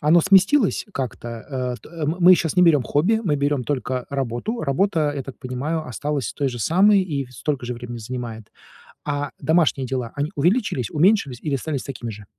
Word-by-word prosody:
оно 155 +3 +5
сместилось 195 - +4
как-то? 125 -2 -4
Э, 125 +2 -4
т 165 -2 -7
мы 160 - 0
мы 180 +1 +8
щас 170 0 -2
не 180 - +6
берём 155 -6 +5
хобби, 185 - +1
мы 150 -4 +1
берём 140 -2 0
только 130 -2 -2
работу. 135 - -3
Работа, 155 0 +1
я 140 - -3
так 135 0 -10
понимаю, 140 +5 -3
осталась 145 +2 -3
той 140 - -1
же 120 -2 -6
самой 190 - +4
и 145 -7 -3
столько 130 +1 -3
же 125 - -3
времени 120 0 -7
занимает. 115 -2 -6 0.6
А 145 -1 -2
домашние 150 -4 +2
дела, 125 -3 -3
они 145 +4 -2
увеличились, 170 - +1
уменьшились 155 - +2
или 145 -3 0
остались 140 0 -3
такими 120 -4 -6
же? 105 0 -11
145 Hz, 185 wpm, -22 LUFS, 125-165 Hz, 0.6 s, мы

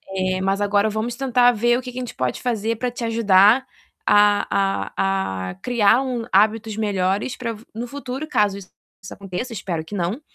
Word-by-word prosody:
eh, 185 0 0
mas 195 +1 0
agora 205 +1 +2
vamos 220 +3 -3
tentar 245 -1 +3
ver 240 +2 +2
o - - -6
que 250 0 -8
que 245 - -11
a 255 - -2
gente 245 - -6
pode 125 -1 -2
fazer 230 -2 -1
para 250 +1 -2
te 240 - -7
ajudar 225 +1 +4 0.4
a 205 0 +4 0.4
a 190 - -2
a - - -11
criar 240 0 +2
um 245 -3 -3
hábitos 215 +2 +2
melhores 200 +2 -1
para 230 -3 -4 0.2
no 235 +2 -5
futuro, 275 +2 -6
caso 205 -7 +1
isso 185 - -14 0.4
aconteça, 195 +6 -6
espero 180 -6 -4
que 165 - -12
não, 185 - -2
215 Hz, 185 wpm, -21 LUFS, 195-245 Hz, 0.4 s, ajudar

